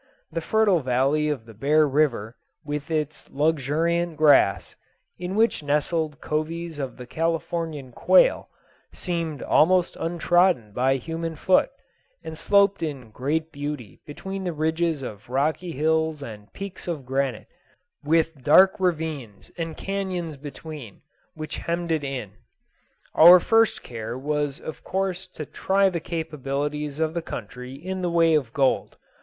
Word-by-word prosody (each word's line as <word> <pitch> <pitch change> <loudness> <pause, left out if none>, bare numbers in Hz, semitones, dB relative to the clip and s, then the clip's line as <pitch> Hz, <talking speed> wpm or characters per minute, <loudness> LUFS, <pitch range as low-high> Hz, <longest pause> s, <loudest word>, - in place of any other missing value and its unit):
The 165 +1 -2
fertile 210 -1 +3
valley 135 +3 +1
of 140 -7 -3
the 115 - -13
Bear 150 +7 +3
River 130 -6 0 0.3
with 150 +1 -4
its 155 -2 -3
luxuriant 160 +3 0
grass, 145 -10 +4 0.4
in 180 +2 -4
which 225 -3 +2
nestled 150 +1 -1
coveys 160 +1 -3
of 135 -2 -4
the 125 - -8
Californian 165 -1 -2
quail - - +4 0.4
seemed 165 -5 -3
almost 180 +2 +3
untrodden 175 - +2
by 130 +3 +2
human 165 +4 -4
foot, 185 +4 +3 0.5
and 160 - -7
sloped 200 +3 +3
in 135 -8 -5
great 155 +7 -2
beauty 145 -7 -6
between 190 +6 -6
the 180 -2 -2
ridges 160 -1 0
of 110 0 -8
rocky 155 +7 0
hills 160 0 0
and 105 -4 -10
peaks 195 -2 -8
of 155 -6 -4
granite, 135 -2 -1 0.6
with 160 -2 +1
dark 190 +9 +6
ravines 155 - -3
and 165 -1 -5
canones 185 -5 -3
between, 145 -4 -9 0.3
which 155 0 -6
hemmed 170 0 -2
it 155 -2 0
in. 130 -7 -4 0.8
Our 175 +3 +9
first 225 +4 +2
care 115 0 -6
was 145 +1 -2
of 155 - -8
course 190 0 -2
to 160 -4 -8
try 195 +5 +1
the 170 - -2
capabilities 150 -2 -3
of 160 0 0
the 170 - -2
country 125 -2 -7
in 185 +6 -5
the 175 - 0
way 165 -1 +4
of 140 -7 +1
gold. 135 0 +1
155 Hz, 140 wpm, -24 LUFS, 140-170 Hz, 0.8 s, Our